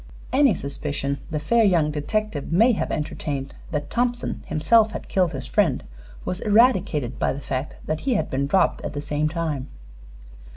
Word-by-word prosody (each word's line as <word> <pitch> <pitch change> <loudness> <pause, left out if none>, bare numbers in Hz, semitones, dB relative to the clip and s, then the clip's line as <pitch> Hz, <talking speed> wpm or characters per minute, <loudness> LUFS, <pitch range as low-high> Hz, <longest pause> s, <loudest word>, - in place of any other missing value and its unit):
Any 270 -6 +5
suspicion 140 -1 -3
the 160 - -2
fair 230 +10 +3
young 170 -7 +3
detective 155 +2 -2
may 225 +9 +5
have 220 - -1
entertained 145 -2 -3 0.2
that 145 -3 -3
Thompson 240 0 -1
himself 215 +9 +3
had - - -6
killed 180 -4 +2
his 135 -1 -5
friend 175 -11 +1 0.4
was 180 - -3
eradicated 190 - +3
by - - +1
the 135 - -6
fact 135 +1 -4
that 155 0 -2
he 255 +4 0
had - - 0
been 140 +1 -1
robbed 190 - +3
at - - -5
the 145 - -3
same 150 +1 -1
time. 155 -5 -3
155 Hz, 170 wpm, -24 LUFS, 145-215 Hz, 0.4 s, Any